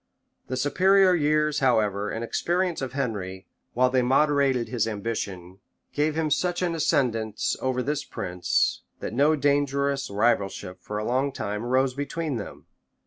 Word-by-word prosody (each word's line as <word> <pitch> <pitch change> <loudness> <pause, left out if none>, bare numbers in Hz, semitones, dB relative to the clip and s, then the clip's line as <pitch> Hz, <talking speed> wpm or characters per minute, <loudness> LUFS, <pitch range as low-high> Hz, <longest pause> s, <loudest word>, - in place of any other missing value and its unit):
The 130 - -3
superior 185 +7 +4
years, 150 -2 +2
however, 105 -6 +1
and 115 - -4
experience 175 +7 -1
of 130 -2 -4
Henry, 100 -8 -3 0.3
while 125 +1 +3
they 130 -1 +3
moderated 135 -1 +2
his 115 -1 -1
ambition, 100 -4 -4 0.3
gave 150 +1 0
him 160 -1 0
such 180 +2 0
an 175 -2 0
ascendant 125 -10 0 0.2
over 130 -1 0
this 145 +1 -2
prince, 90 -9 -1 0.2
that - - -5
no 145 +5 +4
dangerous 140 -1 +1
rivalship 100 -3 0
for 105 - -5
a 105 - -3
long 130 +4 +1
time 105 -3 -4
arose 130 +2 +1
between 145 +1 -3
them. 105 - -8
130 Hz, 145 wpm, -25 LUFS, 110-150 Hz, 0.3 s, superior